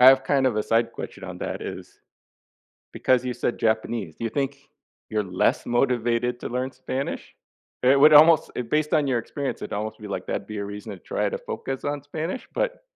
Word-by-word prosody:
I 125 - +9
have 135 0 +6
kind 135 -2 +2
of 120 -4 +1
a 105 - +2
side 115 +1 +1
question - - -7
on - - -7
that - - -4
is - - -8 0.9
because 130 -1 +2
you 125 - -1
said 120 - -2
Japanese, 110 -6 0
do - - -6
you - - 0
think 140 +2 -2 0.5
you're 105 -1 0
less 90 -1 +1
motivated 120 -1 +1
to - - -4
learn 125 +2 -2
Spanish? 130 +1 -4 0.5
It 135 +2 +5
would 150 +2 +8
almost 155 +1 +7 0.2
based 150 +2 +1
on 150 -2 +3
your 130 -3 +2
experience, 140 +4 -4
it'd - - -5
almost 110 +1 -3
be 105 - -8
like 95 -2 -4
that'd 100 - -3
be 105 - -6
a 100 - -3
reason 105 +2 -7
to 95 - -8
try - - -1
to - - -3
focus 135 -1 -5
on 145 -1 -2
Spanish, 160 - -4
but - - -2
125 Hz, 210 wpm, -25 LUFS, 110-140 Hz, 0.9 s, I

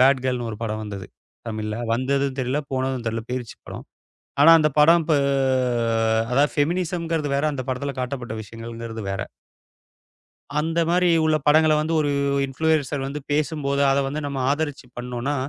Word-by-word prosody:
Bad 130 0 +5
கேர்ள்ன்னு 125 -2 -1
ஒரு - - -6
படம் 110 -1 -2
வந்தது 100 -2 -7 0.4
தமிழ்ல. 110 -1 -3 0.2
வந்ததும் 135 +2 0
தெரியல 130 +4 -1
போனதும் 130 -2 -1
தெரியல. 115 0 -2
போயிருச்சு 125 -2 -5
படம். - - -8 0.6
ஆனா 165 - +8
அந்தப் 155 -1 0
படம் 165 +1 +6
ப - - +4 1.2
அதாவது 140 +3 +3
ஃபெமினிசம்ங்கறது 165 -1 -1
வேற. 140 - 0
அந்தப் 130 -2 -5
படத்துல 140 +2 -2
காட்டப்பட்ட 125 -3 -4
விஷயங்கள்ன்றது 115 0 -7
வேற. 95 0 -3 1.4
அந்த 165 +2 0
மாதிரி 180 0 +3 0.2
உள்ள 155 -1 +3
படங்கள 155 +1 +5
வந்து 160 +2 -2
ஒரு 145 -1 +1 0.4
இன்ஃப்ளுயன்ஸர் 145 -1 0
வந்து 145 +2 -5
பேசும்போது, 145 -2 0
அத 135 - +2
வந்து 150 +3 -3
நம்ம 140 -1 -4
ஆதரிச்சு 145 -3 -2
பண்ணோம்னா, 125 +3 -3
140 Hz, 145 wpm, -23 LUFS, 125-155 Hz, 1.4 s, ஆனா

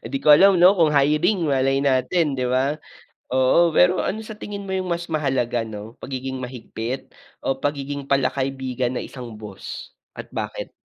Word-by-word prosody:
Hindi 130 +4 -3
ko - - +1
alam, 195 +3 +6
'no, 180 +3 +7
kung 165 -4 +4
hiring, 150 +6 +2
malay 135 -1 +2
natin, 140 +3 +1
di - - 0
ba? 130 +3 +1 0.6
Oo. 130 +7 +4
Pero 180 +1 +5
ano 215 - -2
sa 220 - -8
tingin 200 -1 -6
mo 190 - -5
'yung 185 -1 -2
mas 170 0 -2
mahalaga, 130 -6 0
'no, 105 +1 -9
pagiging 130 0 -5
mahigpit 125 0 -6 0.3
o 135 - 0
pagiging 140 -1 -3
palakaibigan 130 -2 -1
ng - - -3
isang 120 -4 -9
boss? 105 -3 -9 0.2
At - - -9
bakit? - - -5
135 Hz, 165 wpm, -22 LUFS, 130-170 Hz, 0.6 s, no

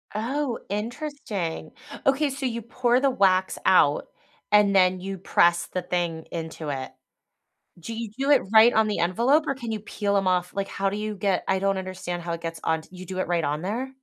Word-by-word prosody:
Oh, 250 +3 -1
interesting, 210 - -4 0.3
okay, 275 +2 +3
so, 270 0 -4
you 235 -1 -3
pour 245 +1 +1
the 275 0 +3
wax 190 -4 +2
out 150 -6 +4 0.4
and 205 -1 +5
then 185 -1 +4
you 195 +1 -5
press 175 -1 +3
the 185 - -4
thing 170 -3 -2
into 160 -2 -5
it? 135 -2 -4 0.9
Do 230 +7 -7
you 225 -1 -5
do 275 +2 +1
it - - +6
right 225 +2 +7
on 220 0 +3
the 210 - -1
envelope 240 - +2
or 275 - +1
can 240 -4 -6
you 215 - -2
peel 200 -1 -1
'em 195 -1 +1
off 180 -1 +1
like, 195 0 -2
how 195 0 -1
do 200 - -4
you 215 0 -3
get 190 -1 0
I 190 0 +2
don't 195 0 +1
understand 185 -2 -5
how 170 - -3
it 170 - -5
gets 165 -1 -5
on 160 0 0
t - - -19
you 185 0 -10
do 185 +1 -5
it 185 - -1
right 170 -2 0
on 150 +2 -1
there? 235 +8 -3
195 Hz, 215 wpm, -25 LUFS, 175-230 Hz, 0.9 s, right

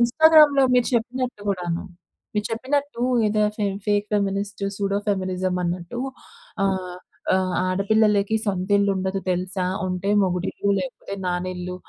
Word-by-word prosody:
ఇన్‌స్టాగ్రామ్‌లో 300 +2 +6
మీరు 245 -1 +3
చెప్పినట్టు 250 0 -2
గూడాను. 175 -3 -1 0.5
మీరు 210 0 0
చెప్పినట్టు 270 +3 -2 0.3
ఏదో 210 0 +1
ఫే 210 - -1 0.2
ఫేక్ 205 0 +1
ఫెమినిస్ట్ 200 0 -1
సూడో 200 0 0
ఫెమినిజం 185 -2 -1
అన్నట్టు 175 +6 -4 0.7
ఆహ్, 185 -2 -2 0.4
ఆహ్, 185 -1 +1
ఆడపిల్లలకి 205 +2 +2
సొంత 190 -2 -2
ఇల్లు 200 0 +2
ఉండదు 190 +1 -1
తెలుసా? 185 +1 -1 0.2
ఉంటే 180 +2 -3
మొగుడిల్లు 185 +2 -1
లేకపోతే 255 -6 -5
నానిల్లు. 180 0 -3
200 Hz, 120 wpm, -23 LUFS, 185-220 Hz, 0.7 s, ఇన్‌స్టాగ్రామ్‌లో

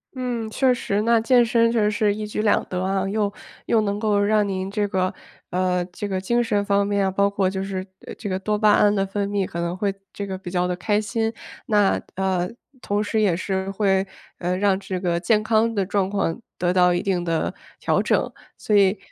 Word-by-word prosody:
嗯， 245 -3 -3
确 260 +3 +2
实， 210 -4 -1
那 230 0 +3
健 245 +1 +4
身 230 0 +3
确 235 - +1
实 210 0 +2
是 210 -1 +1
一 215 0 -4
举 210 0 -3
两 215 -1 +2
得 180 0 -3
啊， 195 0 0
又 205 0 0 0.4
又 230 - +3
能 205 -1 -1
够 210 -2 +2
让 210 0 +2
您 190 -1 -3
这 205 0 0
个， 185 -2 0 0.4
呃， 180 0 0
这 185 +3 -6
个 190 -2 -2
精 235 +5 +1
神 205 -3 0
方 200 0 +2
面 200 0 +1
啊， 190 - 0
包 200 +1 +2
括 200 -1 0
就 190 0 -2
是， 190 -1 -4 0.2
呃， - - -7
这 215 - -7
个 190 -1 -1
多 210 +2 -1
巴 210 0 +4
胺 205 0 +4
的 195 -1 +1
分 200 +1 -2
泌， 200 -1 0
可 170 -1 -5
能 170 +1 -2
会 200 0 0 0.2
这 200 - -5
个 190 -1 -4
比 185 -1 -8
较 180 0 0
地 180 - -1
开 205 +4 0
心。 220 +2 -1 0.4
那， 205 -2 +3
呃， 185 -2 0 0.3
同 205 +1 -1
时 215 +1 0
也 195 -5 +3
是 190 0 -2
会， 195 -1 +1 0.3
呃， 180 +1 -1
让 195 -1 +2
这 190 -2 -4
个 175 -2 0
健 210 +4 +2
康 225 +1 +2
的 200 -2 +1
状 195 0 0
况 195 -2 -1 0.2
得 175 0 +1
到 180 -1 +4
一 175 +1 0
定 190 -4 0
的 165 -2 -1 0.3
调 - - +1
整。 - - 0 0.2
所 210 - 0
以， 200 0 +4
200 Hz, 245 characters per minute, -23 LUFS, 185-210 Hz, 0.4 s, 健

